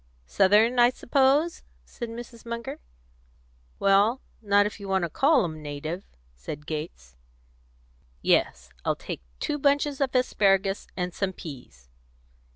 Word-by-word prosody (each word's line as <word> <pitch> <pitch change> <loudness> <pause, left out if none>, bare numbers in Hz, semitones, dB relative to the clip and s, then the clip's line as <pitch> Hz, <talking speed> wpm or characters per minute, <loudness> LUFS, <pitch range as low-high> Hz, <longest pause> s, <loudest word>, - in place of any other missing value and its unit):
"Southern, 210 - +4
I 240 0 +7
suppose?" 275 +6 +2 0.2
said 235 - -7
Mrs. 235 0 -9
Munger. 235 0 -5 1.0
"Well, 200 +6 +3 0.2
not 205 -1 +4
if 210 - -5
you 200 - -8
want 190 -1 +1
to 170 - -2
call 280 - +4
'em 155 -2 -5
native," 150 +5 -5 0.3
said 140 - -8
Gates. 150 - -6 1.1
"Yes, - - +1
I'll - - +1
take - - -7 0.2
two 295 - -2
bunches 285 0 +1
of 265 -1 0
asparagus, 195 -5 +2
and 180 -1 -2
some 190 0 -2
peas." 125 - -11
200 Hz, 130 wpm, -26 LUFS, 160-245 Hz, 1.1 s, I